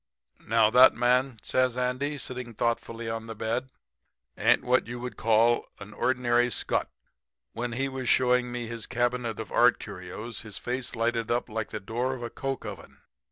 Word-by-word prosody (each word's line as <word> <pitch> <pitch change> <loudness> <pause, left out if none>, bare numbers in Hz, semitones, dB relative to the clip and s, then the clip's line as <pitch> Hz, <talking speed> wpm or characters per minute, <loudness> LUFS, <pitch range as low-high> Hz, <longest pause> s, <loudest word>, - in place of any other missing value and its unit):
"'Now, 110 -1 +3
that 125 +2 +8
man,' 125 +1 +2
says 130 -1 +1
Andy, 130 +4 -1
sitting 125 -3 -6
thoughtfully 115 0 -2
on 115 0 -4
the 110 - -6
bed, 115 +4 -2 0.7
'ain't - - +3
what 125 -1 +2
you 120 +1 -5
would 125 -2 -6
call 115 +2 +3
an 105 +1 -10
ordinary 120 -1 +2
scutt. 100 - -1 0.6
When 120 0 -3
he 135 +3 0
was 130 -2 -3
showing 125 -1 +3
me 120 -1 -3
his 115 -1 -5
cabinet 120 -2 -1
of - - -6
art - - +5
curios 115 +1 -7
his 105 -3 -8
face 125 +1 -3
lighted 115 0 0
up 120 +1 0
like 110 0 -3
the 110 - -4
door 120 +6 -2
of 120 - -8
a 120 - -5
coke 135 -2 -4
oven. - - -9
120 Hz, 175 wpm, -28 LUFS, 115-125 Hz, 0.7 s, that